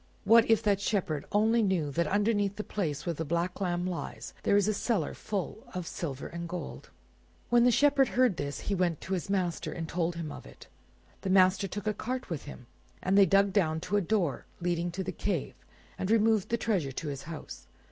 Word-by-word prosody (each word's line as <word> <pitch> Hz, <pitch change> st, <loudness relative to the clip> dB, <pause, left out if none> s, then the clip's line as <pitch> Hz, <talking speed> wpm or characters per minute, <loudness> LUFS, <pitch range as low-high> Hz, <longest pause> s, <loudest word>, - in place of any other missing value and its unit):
"What 225 Hz, +2 st, +6 dB
if 225 Hz, -2 st, +4 dB
that 200 Hz, -2 st, +2 dB
Shepherd 175 Hz, -9 st, -1 dB
only 220 Hz, +3 st, +3 dB
knew 185 Hz, -8 st, +1 dB
that 170 Hz, +3 st, 0 dB
underneath 205 Hz, +1 st, +1 dB
the 210 Hz, -, -4 dB
place 155 Hz, -10 st, -3 dB
where 170 Hz, -, 0 dB
the 160 Hz, -, -3 dB
black 170 Hz, +5 st, -2 dB
lamb 175 Hz, -1 st, 0 dB
lies 180 Hz, -2 st, -5 dB
there 200 Hz, -, +3 dB
is 205 Hz, -, +3 dB
a 215 Hz, -, +2 dB
cellar 200 Hz, -, -1 dB
full 205 Hz, +1 st, -4 dB
of 180 Hz, -2 st, -3 dB
silver 140 Hz, -5 st, -5 dB
and 170 Hz, 0 st, -6 dB
gold!' 175 Hz, -3 st, -6 dB, 0.6 s
When 240 Hz, 0 st, +6 dB
the -, -, +6 dB
Shepherd 275 Hz, +2 st, +4 dB
heard 250 Hz, -8 st, +2 dB
this, 145 Hz, -2 st, -4 dB
he 205 Hz, -, -2 dB
went 175 Hz, -4 st, +1 dB
to 190 Hz, -, -4 dB
his 185 Hz, 0 st, -2 dB
master, 185 Hz, -4 st, -1 dB
and 165 Hz, -2 st, -5 dB
told 170 Hz, 0 st, -1 dB
him 165 Hz, -3 st, -5 dB
of -, -, -9 dB
it. -, -, -14 dB, 0.6 s
The 190 Hz, -, -3 dB
master 190 Hz, +1 st, +4 dB
took 205 Hz, +2 st, -6 dB
a 215 Hz, -, +1 dB
cart 250 Hz, 0 st, -4 dB
with 160 Hz, -, -4 dB
him, 145 Hz, -4 st, -10 dB, 0.4 s
and 190 Hz, +1 st, +2 dB
they 200 Hz, -1 st, +7 dB
dug 195 Hz, +2 st, +4 dB
down 160 Hz, -5 st, +2 dB
to 190 Hz, +4 st, -2 dB
a 205 Hz, -, +4 dB
door 180 Hz, -6 st, 0 dB
leading 175 Hz, 0 st, -1 dB
to 185 Hz, +3 st, -4 dB
the -, -, -3 dB
cave, -, -, -2 dB, 0.5 s
and 190 Hz, -, -2 dB
removed 220 Hz, -2 st, +3 dB
the 235 Hz, -, +1 dB
treasure 190 Hz, -12 st, 0 dB
to 155 Hz, -, -5 dB
his 140 Hz, -2 st, -5 dB
house. 145 Hz, -, -8 dB
185 Hz, 215 wpm, -30 LUFS, 170-210 Hz, 0.6 s, they